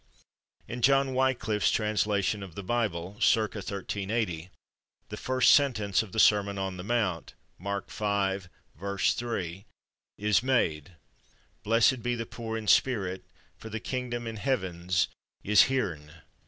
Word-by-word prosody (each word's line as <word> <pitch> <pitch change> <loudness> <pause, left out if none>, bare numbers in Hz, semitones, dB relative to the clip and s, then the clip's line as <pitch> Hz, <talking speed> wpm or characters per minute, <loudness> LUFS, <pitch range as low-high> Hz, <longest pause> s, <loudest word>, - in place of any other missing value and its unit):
In 120 +1 -6
John 135 +1 +4
Wiclif's 125 -5 +1
translation 105 -1 0
of 95 -4 -9
the 100 - -6
Bible 100 -4 -2
(/circa/ 110 -1 +2
1380) 100 -2 -3 0.6
the - - -5
first 130 -1 +4
sentence 110 -9 +3
of 110 -4 -9
the 110 - -2
Sermon 100 -2 +4
on 95 -1 -3
the 90 - -6
Mount 105 -6 -1 0.2
(Mark 100 +2 -4
v, 100 -2 0 0.4
3) 100 -1 -2 0.5
is 105 0 +2
made: 90 - 0 0.7
"Blessed 115 +3 +3
be 120 +1 -1
the 115 -1 -4
pore 115 -1 -5
in 110 - -6
spirit, 95 -6 +2 0.4
for 110 - -9
the 110 0 -4
kyngdam 120 -1 -4
in 115 -1 -5
hevenes 90 -7 0 0.4
is 105 0 +6
/heren 90 - -2
105 Hz, 130 wpm, -28 LUFS, 95-120 Hz, 0.7 s, is